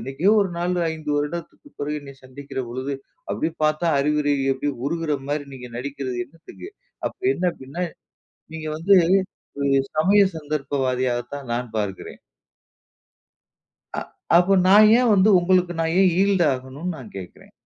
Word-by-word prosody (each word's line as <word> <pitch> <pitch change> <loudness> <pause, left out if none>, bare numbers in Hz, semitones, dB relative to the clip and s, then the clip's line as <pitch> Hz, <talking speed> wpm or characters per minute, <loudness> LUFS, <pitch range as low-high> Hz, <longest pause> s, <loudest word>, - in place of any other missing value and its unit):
என்னைக்கோ 135 - +1
ஒரு 195 -2 0
நாள், 175 +1 -1 0.2
5 155 -2 -6
வருடத்திற்கு 155 - -4
பிறகு 150 +1 -2
என்னை 140 -1 -11
சந்திக்கிற 130 +1 -7
பொழுது, 130 +4 -4 0.4
அப்டினு 160 0 -2
பார்த்தா 155 +2 +1
அறிவுரை 150 0 +1 0.2
எப்டி? 135 +2 -3 0.2
உருகிற 165 -1 -1
மாரி 145 0 -1
நீங்க 125 -1 -9
நடிக்கிறது 135 -1 -4
என்னத்துக்கு? 165 - -12 0.4
அப்ப - - -19
என்ன 185 - -4
அப்டினா, 140 +7 -5 0.7
நீங்க 155 -1 -6
வந்து 195 +5 +4 0.7
ம் 135 -1 +2
சமய 195 +6 +5 0.2
சந்தர்ப்பவாதியாக 135 -5 -1
தான் 135 -4 -8
நான் 120 +1 -2
பார்க்கிறேன். 100 -3 -4 1.8
அ, - - 0 0.4
அப்போ 180 +3 +4 0.2
நான் 210 +2 +8
ஏன் 245 -2 +3
வந்து 195 +2 +4
உங்களுக்கு 180 0 +2
நான் 165 +1 0
ஏன் 190 - +5
ஈல்ட் 195 -4 +3
ஆகணும்னு 135 +7 -5
நான் 125 -7 -11
கேட்கிறேன். 90 -2 -10
150 Hz, 140 wpm, -23 LUFS, 135-175 Hz, 1.8 s, நான்